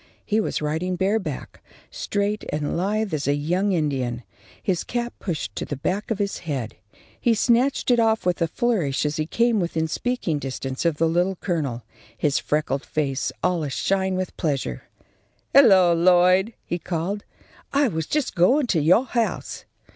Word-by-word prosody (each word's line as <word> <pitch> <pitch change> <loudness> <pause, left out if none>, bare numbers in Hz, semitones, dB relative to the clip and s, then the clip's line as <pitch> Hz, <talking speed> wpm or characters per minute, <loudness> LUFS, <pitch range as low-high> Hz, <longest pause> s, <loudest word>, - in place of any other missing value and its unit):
He 215 +1 +1
was 210 - -1
riding 160 +5 -1
bareback, 190 -6 -2 0.3
straight 205 +1 -2
and 150 -1 -2
lithe 200 +2 -1
as 150 -2 -1
a 140 - +3
young 180 +7 0
Indian, 135 -8 -1 0.4
his 185 -4 -1
cap 240 0 -3
pushed 150 - -4
to - - -3
the 145 - -4
back 185 - -2
of 225 - 0
his 200 -1 -2
head. 135 -9 -4 0.5
He 235 -2 +3
snatched 250 +4 +2
it 240 - +4
off 225 -3 +2
with 180 -2 0
a 165 - +3
flourish 165 - 0
as 150 +2 -1
he 155 0 -1
came 230 +3 +2
within 165 -3 -1
speaking 180 -5 -1
distance 135 +1 -4
of 165 -3 +2
the 165 - +2
Little 175 +4 +1
Colonel, 145 - -2 0.3
his 145 -1 +1
freckled 150 -2 -1
face 140 -3 -1
all 180 -2 +1
ashine 190 +6 0
with 185 -1 -3
pleasure. 135 - -2 0.7
"Hello! 195 -10 +7
Lloyd," 185 +4 +4
he 175 - -3
called, 180 +5 -3 0.5
"I 280 0 +3
was 160 -7 -3
just 295 -4 -1
going 255 - +4
to 160 - +2
your 180 - +4
house." 235 -3 -2
175 Hz, 165 wpm, -23 LUFS, 150-210 Hz, 0.7 s, Hello